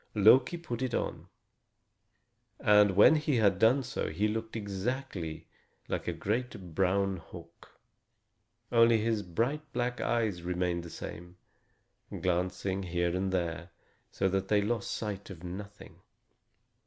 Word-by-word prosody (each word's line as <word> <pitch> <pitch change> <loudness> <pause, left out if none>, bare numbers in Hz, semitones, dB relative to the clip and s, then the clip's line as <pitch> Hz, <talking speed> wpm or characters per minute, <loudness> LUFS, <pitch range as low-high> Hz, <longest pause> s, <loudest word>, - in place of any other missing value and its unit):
Loki 125 - +5
put 130 -8 -5
it 130 -3 -1
on, - - -3 1.3
and 105 -2 +5
when 130 +10 +7
he 150 -2 0
had 100 -4 +3
done 125 +6 +4
so 125 - -3
he 105 - 0
looked 110 +1 -4
exactly 100 -5 -4 0.4
like - - -3
a - - +1
great 105 -5 -3
brown 95 +2 +1
hawk. 85 - -14 0.9
Only 115 -1 +6
his 110 0 0
bright 115 - -1
black 120 0 -1
eyes 110 -7 0
remained 90 0 -1
the 85 - -9
same, 90 +2 -8 0.8
glancing 90 +2 -1
here 85 -1 -1
and 95 +1 -1
there, 85 -1 -2 0.4
so 95 - 0
that 95 0 -1
they 105 -1 +3
lost 115 0 -1
sight 100 -2 -4
of 90 -3 -10
nothing. 100 +3 -9
100 Hz, 130 wpm, -30 LUFS, 90-115 Hz, 1.3 s, when